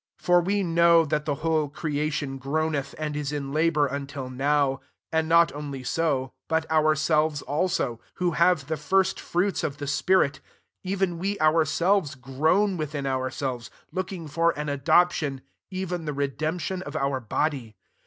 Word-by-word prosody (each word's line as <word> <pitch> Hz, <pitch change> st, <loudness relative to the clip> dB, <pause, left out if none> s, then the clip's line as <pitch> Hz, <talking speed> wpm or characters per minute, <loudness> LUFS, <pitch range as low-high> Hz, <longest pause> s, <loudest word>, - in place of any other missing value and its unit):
22 -, -, -23 dB
For 175 Hz, 0 st, +5 dB
we 200 Hz, +2 st, +1 dB
know 170 Hz, -1 st, +5 dB
that 150 Hz, 0 st, -1 dB
tbe 145 Hz, -2 st, 0 dB
whole 160 Hz, -2 st, +1 dB
creation 145 Hz, -2 st, -2 dB
groaneth 145 Hz, +1 st, -2 dB
and 155 Hz, -1 st, -3 dB
is 145 Hz, -1 st, -2 dB
in 140 Hz, -2 st, -4 dB
labour 155 Hz, -1 st, +3 dB
until 140 Hz, -1 st, -5 dB
now: 140 Hz, +1 st, +1 dB, 0.3 s
23 160 Hz, -, +2 dB
and 160 Hz, 0 st, -2 dB
not 170 Hz, -1 st, +5 dB
only 140 Hz, -3 st, -6 dB
«o, 135 Hz, -6 st, 0 dB
but 160 Hz, 0 st, +1 dB
ourselves 155 Hz, -1 st, +2 dB
also, 145 Hz, -6 st, -1 dB, 0.2 s
who 180 Hz, -1 st, 0 dB
have 170 Hz, -2 st, +3 dB
the 160 Hz, +2 st, -2 dB
first 190 Hz, +6 st, +1 dB
fruits 185 Hz, +3 st, -1 dB
of 140 Hz, -, -2 dB
the 145 Hz, -, -5 dB
spirit, 145 Hz, +1 st, +2 dB, 0.4 s
even 190 Hz, -2 st, -1 dB
we 200 Hz, +3 st, -2 dB
ourselves 155 Hz, +2 st, +2 dB
groan 160 Hz, +10 st, +1 dB
within 150 Hz, -2 st, -3 dB
ourselves, 130 Hz, -2 st, -2 dB, 0.2 s
looking 185 Hz, -3 st, -4 dB
for 165 Hz, +2 st, +1 dB
an 150 Hz, 0 st, -3 dB
adoption, 145 Hz, 0 st, +2 dB, 0.3 s
even 185 Hz, -3 st, -4 dB
the 150 Hz, -, -2 dB
redemption 155 Hz, +6 st, -2 dB
of 145 Hz, -4 st, -8 dB
our 140 Hz, -3 st, 0 dB
body. 120 Hz, -1 st, -2 dB
155 Hz, 155 wpm, -26 LUFS, 140-170 Hz, 0.4 s, For